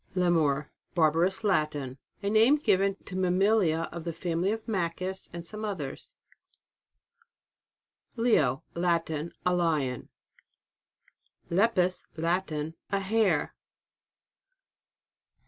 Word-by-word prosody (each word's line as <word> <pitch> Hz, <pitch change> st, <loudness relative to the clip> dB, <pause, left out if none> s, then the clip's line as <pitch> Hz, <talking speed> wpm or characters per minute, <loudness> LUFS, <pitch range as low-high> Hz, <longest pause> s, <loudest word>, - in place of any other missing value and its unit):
LEMUR. 160 Hz, -5 st, +2 dB, 0.2 s
Barbarous 170 Hz, +4 st, +2 dB
Latin. 150 Hz, -8 st, 0 dB, 0.2 s
A 200 Hz, -, 0 dB
name 225 Hz, +6 st, +6 dB
given 200 Hz, -8 st, +2 dB
to 185 Hz, -, -8 dB
mammalia 185 Hz, -2 st, +2 dB
of 170 Hz, -1 st, -6 dB
the 170 Hz, 0 st, -3 dB
family 170 Hz, +3 st, -1 dB
of 225 Hz, 0 st, -4 dB
makis 185 Hz, -2 st, -2 dB
and 170 Hz, 0 st, -7 dB
some 215 Hz, +4 st, -6 dB
others. 180 Hz, -11 st, -5 dB, 2.0 s
LEO. 165 Hz, -, +2 dB
Latin. 170 Hz, -2 st, 0 dB
A 180 Hz, -, +3 dB
Lion. 155 Hz, -8 st, 0 dB, 1.4 s
LEPUS. 185 Hz, -1 st, +2 dB, 0.2 s
Latin. 160 Hz, -2 st, -1 dB, 0.2 s
A 200 Hz, -, +2 dB
Hare. 195 Hz, -5 st, +1 dB
175 Hz, 95 wpm, -28 LUFS, 160-195 Hz, 2.0 s, name